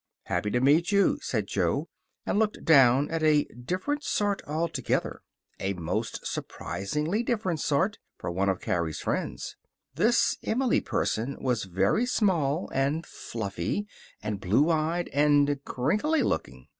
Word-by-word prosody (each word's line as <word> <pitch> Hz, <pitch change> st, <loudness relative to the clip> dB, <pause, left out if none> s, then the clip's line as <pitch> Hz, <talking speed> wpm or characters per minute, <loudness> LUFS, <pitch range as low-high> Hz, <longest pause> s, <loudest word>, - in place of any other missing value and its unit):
"Happy 105 Hz, -, -1 dB
to 125 Hz, -, +1 dB
meet 150 Hz, +8 st, +3 dB
you," 200 Hz, -1 st, +3 dB
said 110 Hz, -5 st, -1 dB
Jo, 100 Hz, -, 0 dB, 0.4 s
and 205 Hz, -, +1 dB
looked 215 Hz, -1 st, 0 dB
down 135 Hz, -2 st, +6 dB
at 165 Hz, -1 st, -1 dB
a 155 Hz, -2 st, +4 dB
different 185 Hz, -, -3 dB
sort 205 Hz, -1 st, 0 dB
altogether. 160 Hz, +3 st, -1 dB, 0.4 s
A 95 Hz, +1 st, -1 dB
most 85 Hz, -3 st, -3 dB
surprisingly 150 Hz, -, -2 dB
different 210 Hz, -9 st, -1 dB
sort, 185 Hz, +10 st, +1 dB, 0.2 s
for -, -, -4 dB
one 95 Hz, +3 st, +1 dB
of 95 Hz, -, 0 dB
Carrie's 85 Hz, -3 st, -1 dB
friends. -, -, -3 dB, 0.4 s
This 235 Hz, +2 st, +3 dB
Emily 250 Hz, +2 st, +1 dB
person 120 Hz, +6 st, -1 dB
was 125 Hz, -6 st, 0 dB
very 95 Hz, -, +1 dB
small, 170 Hz, -, +1 dB
and 140 Hz, +5 st, 0 dB
fluffy, 100 Hz, -, -4 dB, 0.4 s
and 105 Hz, -2 st, -3 dB
blue 110 Hz, -, +3 dB
eyed, 165 Hz, +2 st, 0 dB
and 145 Hz, -1 st, +3 dB
crinkly 210 Hz, -, +1 dB
looking. 65 Hz, -, -3 dB
145 Hz, 135 wpm, -27 LUFS, -, 0.4 s, down